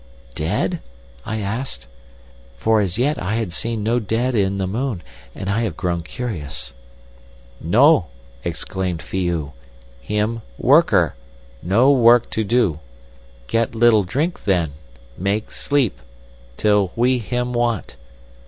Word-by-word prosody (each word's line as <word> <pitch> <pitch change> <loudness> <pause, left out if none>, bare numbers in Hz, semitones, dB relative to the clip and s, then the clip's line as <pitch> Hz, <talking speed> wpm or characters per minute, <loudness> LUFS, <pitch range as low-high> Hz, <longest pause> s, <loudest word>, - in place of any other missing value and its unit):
"'Dead?' 105 - -1 0.5
I 110 0 -2
asked. 100 - -4 0.7
(For 110 - +3
as 95 -2 -2
yet 145 +5 +1
I 100 +4 -1
have 110 -7 -2
seen 115 +2 -2
no 115 +3 +2
dead 115 +4 -1
in 100 -3 +1
the 95 - -1
moon, 110 0 -2 0.3
and 95 - -6
I 105 +4 +1
have 105 -9 -2
grown 85 -2 -1
curious.) 80 - -5 0.9
"'No!' 115 - +4 0.4
exclaimed 90 -3 -3
Phi 95 -2 -2
oo. 80 -5 -2 0.5
'Him—worker—no 85 - +1
work 120 -3 +5
to 110 - 0
do. 105 -8 +1 0.7
Get 115 - 0
little 115 -2 +5
drink 145 - -2
then—make 80 - -2
sleep—till - - -1
we 125 +2 +2
him 125 +2 -2
want. 120 -4 -1
105 Hz, 115 wpm, -21 LUFS, 85-120 Hz, 0.9 s, work